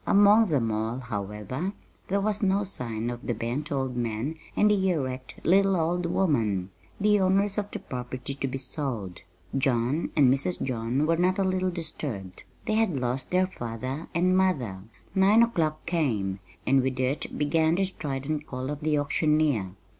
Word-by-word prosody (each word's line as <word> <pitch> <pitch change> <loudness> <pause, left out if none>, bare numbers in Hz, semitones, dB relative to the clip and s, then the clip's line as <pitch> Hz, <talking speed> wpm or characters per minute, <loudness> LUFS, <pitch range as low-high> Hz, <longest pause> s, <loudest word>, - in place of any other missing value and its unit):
Among 205 +2 +6
them 125 -8 +1
all, 110 +3 -1
however, 110 - -4 0.3
there 200 +1 +1
was 210 0 0
no 200 0 +2
sign 120 - -3
of 120 0 -6
the 120 - 0
bent 125 +8 -3
old 130 -3 -1
man 120 +4 -2 0.2
and 210 0 +4
the 190 -2 +2
erect 130 -6 -2
little 195 +2 +4
old 170 +1 0
woman, 110 - +1 0.3
the 210 0 +4
owners 195 +2 +2
of 205 0 -4
the - - -5
property 125 +1 -5
to 135 0 -3
be 135 +1 -3
sold. 125 - -4 0.3
John 135 +3 +1
and 135 -4 +6
Mrs. 145 +6 -1
John 125 +3 0
were 165 +1 +2
not 185 +2 +2
a 195 - +2
little 185 0 +1
disturbed 145 - -6 0.2
they 220 - 0
had 215 -10 +2
lost 125 +1 -2
their 185 +1 +3
father 130 -2 -5
and 185 +2 +3
mother. 140 - +1 0.3
Nine 200 +4 +6
o'clock 160 -9 0
came, 110 - 0 0.3
and 135 0 +4
with 130 0 -2
it 130 +3 -1
began 160 +2 +2
the 195 +2 +2
strident 150 -3 -4
call 130 +1 -4
of 145 - -4
the 150 0 +1
auctioneer. 145 - +1
145 Hz, 170 wpm, -27 LUFS, 125-185 Hz, 0.3 s, Among